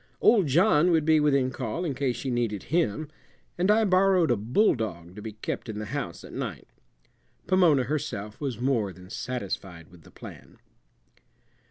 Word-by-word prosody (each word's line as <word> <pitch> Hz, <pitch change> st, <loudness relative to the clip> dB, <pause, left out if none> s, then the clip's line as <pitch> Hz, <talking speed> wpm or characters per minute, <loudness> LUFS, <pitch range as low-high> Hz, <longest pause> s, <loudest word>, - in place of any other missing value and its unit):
Old 205 Hz, -8 st, +4 dB
John 150 Hz, +3 st, +4 dB
would 160 Hz, -3 st, +2 dB
be 160 Hz, -1 st, +5 dB
within 140 Hz, -3 st, +2 dB
call 130 Hz, +7 st, -4 dB
in 150 Hz, -, -1 dB
case 130 Hz, -2 st, -1 dB
she 130 Hz, +2 st, -4 dB
needed 115 Hz, -5 st, -1 dB
him, 155 Hz, -4 st, +1 dB, 0.5 s
and 180 Hz, +3 st, 0 dB
I 220 Hz, +1 st, +4 dB
borrowed 185 Hz, -5 st, +3 dB
a -, -, +4 dB
bulldog 110 Hz, -, 0 dB
to 105 Hz, -, -8 dB
be 110 Hz, 0 st, -7 dB
kept 110 Hz, +2 st, -5 dB
in 105 Hz, -, -5 dB
the 105 Hz, -, -4 dB
house -, -, -4 dB
at -, -, -11 dB
night. -, -, -5 dB, 0.8 s
Pomona 175 Hz, -8 st, +4 dB
herself 125 Hz, -7 st, -4 dB
was 130 Hz, -6 st, -3 dB
more 120 Hz, -6 st, 0 dB
than 90 Hz, +1 st, -14 dB
satisfied 95 Hz, -9 st, -5 dB
with 90 Hz, -2 st, -17 dB
the -, -, -17 dB
plan. -, -, -12 dB
130 Hz, 170 wpm, -27 LUFS, 105-160 Hz, 0.8 s, be